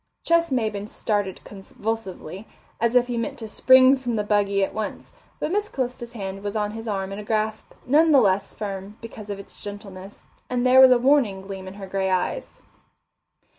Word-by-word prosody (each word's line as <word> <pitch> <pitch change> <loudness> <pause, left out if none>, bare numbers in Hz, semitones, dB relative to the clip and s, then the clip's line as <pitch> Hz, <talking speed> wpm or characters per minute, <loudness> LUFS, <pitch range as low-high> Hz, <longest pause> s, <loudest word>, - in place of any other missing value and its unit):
Ches 335 -2 +2
Maybin 215 -5 -1
started 205 -4 -2
convulsively, 200 -2 -6 0.3
as 235 +1 +1
if 250 -1 +5
he 245 -1 -3
meant 230 - -3
to 225 - -7
spring 260 +4 +6
from 245 -3 -3
the 210 - 0
buggy 200 -1 +1
at - - -2
once, 215 -1 -5 0.3
but 305 - -2
Miss 415 +2 0
Calista's 250 - -4
hand 195 -3 -6
was 205 +1 -4
on 210 -1 -1
his 225 +1 -7
arm 195 -2 -2
in 200 - -5
a - - -6
grasp 215 0 -2
none 310 +5 +4
the 280 - +7
less 195 -3 +2
firm 200 0 -6
because 220 -2 -10
of 200 - -4
its 200 - -10
gentleness, 200 -1 -9 0.3
and 250 0 0
there 255 +1 +7
was 260 - +9
a 250 - +6
warning 240 -7 +2
gleam 190 -1 -8
in 190 - -9
her 200 -1 -8
grey 190 0 -1
eyes. 185 - -2
215 Hz, 195 wpm, -24 LUFS, 195-245 Hz, 0.3 s, was